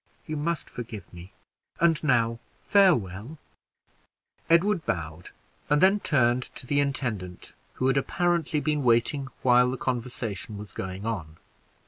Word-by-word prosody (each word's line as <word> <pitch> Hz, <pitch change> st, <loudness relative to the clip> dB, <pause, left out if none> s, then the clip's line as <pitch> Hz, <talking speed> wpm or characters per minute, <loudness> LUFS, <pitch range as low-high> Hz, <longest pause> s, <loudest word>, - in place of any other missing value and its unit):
You 155 Hz, -, -4 dB
must 155 Hz, +2 st, -2 dB
forgive 110 Hz, -6 st, -8 dB
me; 90 Hz, +2 st, -11 dB, 0.5 s
and 165 Hz, -1 st, +3 dB
now, 115 Hz, -5 st, +2 dB, 0.2 s
farewell!" 130 Hz, -, +2 dB, 1.1 s
Edward 175 Hz, +2 st, +3 dB
bowed, 80 Hz, -1 st, -4 dB, 0.4 s
and 150 Hz, 0 st, +4 dB
then 195 Hz, +4 st, +5 dB
turned 125 Hz, -8 st, +2 dB
to -, -, -8 dB
the 145 Hz, +3 st, +1 dB
intendant, 115 Hz, -10 st, -3 dB, 0.2 s
who 130 Hz, -, -2 dB
had 135 Hz, +1 st, +3 dB
apparently 170 Hz, 0 st, 0 dB
been 150 Hz, -1 st, 0 dB
waiting 125 Hz, +3 st, +2 dB, 0.2 s
while 125 Hz, 0 st, +5 dB
the 130 Hz, -, -3 dB
conversation 120 Hz, -5 st, -4 dB
was 105 Hz, 0 st, -9 dB
going 95 Hz, +2 st, -6 dB
on. 85 Hz, -9 st, -4 dB
125 Hz, 130 wpm, -27 LUFS, 105-150 Hz, 1.1 s, then